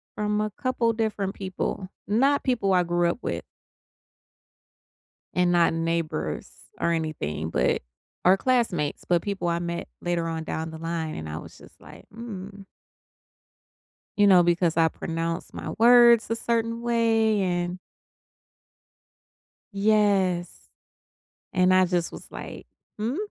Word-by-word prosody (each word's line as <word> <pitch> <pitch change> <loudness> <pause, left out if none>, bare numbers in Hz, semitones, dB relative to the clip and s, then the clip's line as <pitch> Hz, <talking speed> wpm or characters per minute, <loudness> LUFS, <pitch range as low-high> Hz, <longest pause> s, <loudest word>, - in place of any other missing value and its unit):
from 210 0 0
a 215 -1 -2
couple 235 -1 0
different 210 -3 -2
people, 185 0 -4 0.2
not 270 +7 +2
people 230 -7 +1
I 180 -1 +4
grew 175 0 +1
up 175 - -2
with. - - -3 1.9
And 180 -1 +3
not 170 -2 +3
neighbors 165 -1 -2 0.3
or 170 - +2
anything, 80 - -3
but 65 -6 +1 0.4
our 185 +2 +6
classmates, 205 - 0
but 175 -1 +3
people 195 -4 -3
I 170 0 +1
met 170 0 -4
later 170 -1 -1
on 160 -1 -3
down 160 +1 -4
the 160 - -9
line 165 -1 -3
and 80 0 -6
I 80 +1 -4
was - - -12
just - - -18
like, - - -14
"mm" 200 -4 -8 1.5
you 205 - +5
know, 180 -2 +7
because 170 -1 +1
I 165 -1 +4
pronounce 165 +1 -4
my - - -6
words 235 -1 +6
a 230 - +1
certain 230 0 -1
way 225 -3 +2
and 175 0 -1 1.9
Yes, 200 -4 +1 0.8
and 185 0 +3
I 185 0 +6
just 175 -1 -1
was - - -10
like, - - -8 0.3
"Hmm?" 230 +7 -2
185 Hz, 135 wpm, -25 LUFS, 170-220 Hz, 1.9 s, know